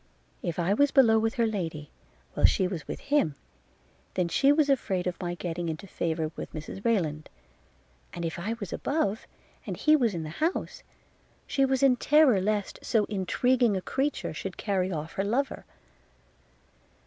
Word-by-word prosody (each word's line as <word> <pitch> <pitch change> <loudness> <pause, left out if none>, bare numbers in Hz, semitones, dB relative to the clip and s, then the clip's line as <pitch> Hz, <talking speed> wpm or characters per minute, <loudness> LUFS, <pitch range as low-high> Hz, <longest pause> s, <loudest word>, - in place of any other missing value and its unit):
If 170 -2 -3
I 175 +3 +1
was 285 +7 +4
below 230 -6 +5
with 225 +2 0
her 235 -2 +2
lady, 165 -9 -4 0.4
while - - +5
she 190 - +1
was 180 -4 -6
with - - -5
him, 285 - +1 0.8
then 180 -2 +1
she 275 +11 +4
was 295 0 +3
afraid 195 -10 0
of 180 -1 -3
my 175 -1 -3
getting 170 0 -4
into 160 +4 -5
favour 160 -4 -2
with - - -7
Mrs 155 +5 -7
Rayland; 160 -10 0 0.8
and 170 -1 -5
if 165 +1 -4
I 210 +6 -2
was 205 -6 -6
above, 245 -8 -1 0.4
and - - -4
he 305 0 +5
was 235 -9 +1
in 165 - -3
the 155 - -6
house, 330 +4 -1 0.6
she 275 -1 +2
was 265 0 0
in 260 -2 +5
terror 280 -8 +4
lest 205 0 -1
so 220 -4 +1
intriguing 220 +3 +2
a - - 0
creature 280 +2 -2
should - - -6
carry 190 -2 -1
off 155 -1 -4
her 195 - -1
lover. 250 +7 -1
200 Hz, 170 wpm, -28 LUFS, 175-260 Hz, 0.8 s, below